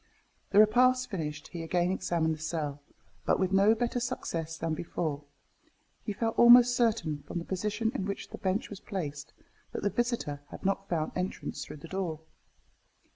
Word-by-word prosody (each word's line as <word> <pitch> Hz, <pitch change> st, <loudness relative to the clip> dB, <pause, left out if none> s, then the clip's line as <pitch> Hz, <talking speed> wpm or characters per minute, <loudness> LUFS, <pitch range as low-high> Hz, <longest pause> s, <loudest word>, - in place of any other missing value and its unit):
The 200 Hz, -, +1 dB
repast 250 Hz, +4 st, +5 dB
finished, 150 Hz, -5 st, -4 dB
he 170 Hz, -, -6 dB
again 175 Hz, +2 st, +1 dB
examined 170 Hz, -4 st, 0 dB
the 155 Hz, -, -7 dB
cell, 150 Hz, -3 st, -3 dB, 0.4 s
but -, -, +2 dB
with 190 Hz, -1 st, +1 dB
no 200 Hz, +3 st, +5 dB
better 240 Hz, +1 st, -1 dB
success 165 Hz, -10 st, -3 dB
than 165 Hz, 0 st, -1 dB
before; 155 Hz, -2 st, -2 dB
and -, -, -27 dB, 0.8 s
he 215 Hz, -, -2 dB
felt 225 Hz, +2 st, -1 dB
almost 245 Hz, +1 st, +8 dB
certain, 215 Hz, -12 st, +1 dB
from -, -, -4 dB
the 170 Hz, -, -4 dB
position 210 Hz, +4 st, -1 dB
in 225 Hz, -9 st, -2 dB
which 200 Hz, -, -4 dB
the -, -, -8 dB
bench 195 Hz, +4 st, -1 dB
was 200 Hz, -, -7 dB
placed, 145 Hz, -9 st, -5 dB, 0.4 s
that -, -, -4 dB
the 205 Hz, -, +1 dB
visitor 225 Hz, -, -1 dB
had -, -, -10 dB
not 195 Hz, 0 st, 0 dB
found 160 Hz, -3 st, -1 dB
entrance 180 Hz, +1 st, -3 dB
through -, -, -9 dB
the 150 Hz, -, -10 dB
door. 175 Hz, -4 st, -3 dB
190 Hz, 180 wpm, -30 LUFS, 160-220 Hz, 0.8 s, almost